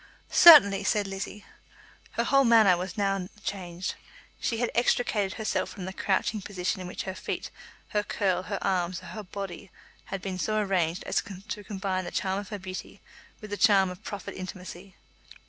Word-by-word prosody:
"Certainly," 200 - +9
said 205 0 +2
Lizzie. 195 +1 -6 0.7
Her - - 0
whole 275 0 +4
manner 225 -6 +6
was 180 +2 -5
now 195 -2 0
changed. 180 -2 -4 0.5
She 230 - -1
had 240 +1 0
extricated 225 -4 +1
herself 220 - -1
from 190 -3 -7
the 190 - -5
crouching 210 +2 0
position 185 0 -3
in 180 - -6
which 180 - -5
her 190 - -4
feet, - - -5 0.4
her 210 - +1
curl, 190 -3 0
her - - -4
arms, 180 -1 0
her - - -11
whole 215 - -6
body 195 -1 -7 0.4
had 195 - -4
been 185 -1 -5
so 215 +3 0
arranged 185 -4 0
as - - 0 0.3
to 210 - -4
combine 190 -2 -3
the - - -4
charm 190 0 -1
of 200 - -8
her 210 - -4
beauty 185 -1 -8 0.4
with 215 -1 -9
the 205 - -2
charm 195 -4 +5
of 180 +4 -11
proffered 205 -2 -6
intimacy. 185 0 -8
195 Hz, 180 wpm, -28 LUFS, 185-210 Hz, 0.7 s, Certainly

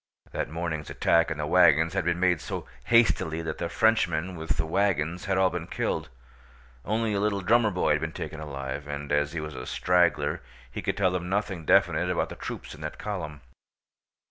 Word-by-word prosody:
That - - -3
morning's 80 -2 -4
attack 85 0 +3
on 80 - -3
the 75 - -2
wagons 80 +3 +5
had 95 -3 -1
been 85 0 +1
made 90 -3 +2
so - - -5 0.2
hastily 85 -9 +3
that 80 -1 -4
the 85 - -2
Frenchmen 95 -5 +1
with 80 -1 -3
the 80 - 0
wagons 90 -1 0
had 95 -1 0
all 95 -1 +3
been 85 -1 -4
killed; - - -2 0.7
only 110 +1 0
a 100 - 0
little 100 -1 0
drummer 115 +3 +4
boy 90 -3 +1
had - - +2
been - - -2
taken 80 - -6
alive, 70 -1 -5
and 75 0 -5
as 75 +1 +1
he 85 - -2
was 75 0 -6
a - - -7
straggler 85 -5 +2 0.3
he - - -5
could - - -2
tell 95 -3 +3
them 90 -1 -3
nothing 95 -4 -2
definite 90 -2 +3
about 90 - 0
the - - -7
troops - - -7
in 75 - -12
that 75 +1 -5
column. 85 -8 -5
85 Hz, 200 wpm, -27 LUFS, 75-95 Hz, 0.7 s, wagons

